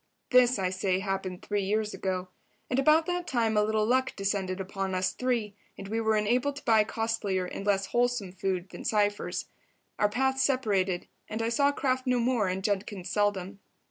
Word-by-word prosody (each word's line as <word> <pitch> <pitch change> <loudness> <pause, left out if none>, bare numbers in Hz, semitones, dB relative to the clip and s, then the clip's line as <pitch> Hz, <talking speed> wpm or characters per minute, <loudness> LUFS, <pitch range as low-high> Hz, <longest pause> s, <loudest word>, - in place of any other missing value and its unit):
This, 250 -1 +5
I 185 -2 0
say, 185 0 0
happened 190 -1 -3
three 205 -1 -1
years 210 +2 -1
ago. 185 -1 -3 0.4
And 255 - +2
about 310 +4 +5
that 355 0 -2
time 230 -3 +1
a 210 - +4
little 215 0 +1
luck 260 +3 +1
descended 195 -2 -1
upon 190 0 -3
us 185 0 0
three, 240 -5 -1 0.2
and 195 - -8
we 225 +1 -1
were 220 -1 +2
enabled 245 +7 +1
to 285 - -9
buy 220 -2 +5
costlier 215 -4 -1
and 195 +2 -6
less 195 -1 +2
wholesome 240 -4 0
food 190 -1 -2
than - - -8
Cypher's. 205 -1 0 0.5
Our 210 - +3
paths 265 +4 +1
separated, 205 -10 +1 0.2
and 220 - -3
I 225 - 0
saw 280 +4 +3
Kraft 260 -2 -1
no 250 -1 +3
more 235 -4 +1
and 185 +1 -2
Judkins 195 -2 -2
seldom. 200 -2 0
210 Hz, 185 wpm, -28 LUFS, 190-245 Hz, 0.5 s, This